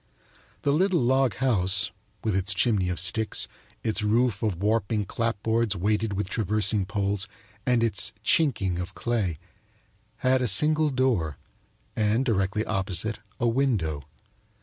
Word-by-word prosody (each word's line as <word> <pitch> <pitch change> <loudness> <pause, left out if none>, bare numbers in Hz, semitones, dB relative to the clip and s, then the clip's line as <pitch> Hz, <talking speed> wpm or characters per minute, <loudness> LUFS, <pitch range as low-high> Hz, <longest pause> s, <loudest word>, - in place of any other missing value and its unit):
The 140 - +2
little 180 +2 +2
log 130 -3 +2
house, 100 -7 +2 0.3
with 110 -4 0
its 95 +1 +1
chimney 100 -4 +1
of 90 - -1
sticks, 105 +6 +2 0.4
its 110 -1 -1
roof 110 0 +1
of 105 -6 -1
warping 105 0 0
clapboards 115 +1 -1
weighted 105 +3 0
with 100 0 -2
traversing 105 -1 0
poles 100 0 -1 0.4
and 125 -2 +3
its 110 -4 +2
"chinking" 105 - +2
of 90 +2 -6
clay, 105 -9 -1 0.9
had 130 0 +3
a 125 - +1
single 150 +8 +3
door 120 - 0 0.6
and, 110 +4 +1
directly 105 -1 0
opposite, 95 +1 -2 0.2
a 120 - +1
window. 115 - 0
110 Hz, 130 wpm, -26 LUFS, 95-120 Hz, 0.9 s, and